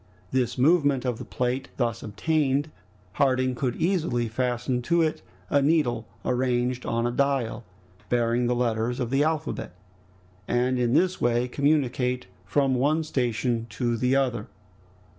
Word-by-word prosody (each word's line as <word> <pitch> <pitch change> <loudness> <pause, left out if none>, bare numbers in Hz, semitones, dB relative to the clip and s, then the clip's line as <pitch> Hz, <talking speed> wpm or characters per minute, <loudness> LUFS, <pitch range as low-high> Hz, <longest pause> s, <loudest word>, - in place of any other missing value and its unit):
This 125 -2 0
movement 145 -2 +3
of 125 -3 -1
the - - -5
plate 125 +2 -2
thus 115 -3 -1
obtained, 145 +5 0 0.4
Harding 130 +2 +2
could 125 -1 -2
easily 160 -10 0
fasten 125 +2 -1
to 170 +6 +2
it 155 - -1 0.3
a 140 - +4
needle 140 -7 +1 0.2
arranged 125 0 0
on 115 0 0
a 120 - +1
dial, 125 -3 0 0.5
bearing 120 0 +1
the 125 - +1
letters 120 0 0
of 125 -2 -2
the 135 +2 +3
alphabet, 155 - -2 0.7
and 125 +1 +1
in 120 -1 +1
this 185 +2 +2
way 120 +1 +2
communicate 125 -3 +1 0.2
from 135 +6 +2
one 145 +5 +2
station 120 -4 -1
to 120 +2 -1
the 125 +3 +1
other. 125 -5 0
125 Hz, 140 wpm, -26 LUFS, 120-140 Hz, 0.7 s, a